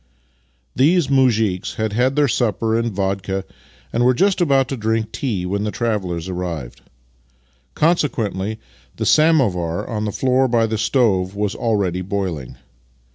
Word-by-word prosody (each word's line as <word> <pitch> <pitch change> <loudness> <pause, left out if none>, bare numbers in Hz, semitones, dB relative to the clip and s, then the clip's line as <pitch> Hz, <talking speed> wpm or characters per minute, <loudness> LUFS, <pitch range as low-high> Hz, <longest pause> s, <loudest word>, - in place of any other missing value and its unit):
These 155 +2 +3
mtizhiks 115 -9 +1
had 110 -1 -2
had 125 +4 +1
their 145 -1 +3
supper 115 -2 0
and 115 0 0
vodka, 95 0 -2 0.5
and 120 - +1
were 125 +1 +4
just 195 +4 +2
about 135 -5 +3
to 135 - -2
drink 110 -1 -1
tea 105 -10 -2
when 100 +3 -2
the 105 - -1
travellers 95 -7 -2
arrived. 85 -9 -5 0.9
Consequently, 110 - 0 0.4
the 110 - -3
samovar 115 - +2
on 110 -2 -3
the 105 - -2
floor 130 +3 +2
by 115 -2 +2
the 110 -1 -2
stove 105 -6 +1
was 105 -1 -1
already 100 -6 -1
boiling. 90 - -4
110 Hz, 140 wpm, -20 LUFS, 95-130 Hz, 0.9 s, were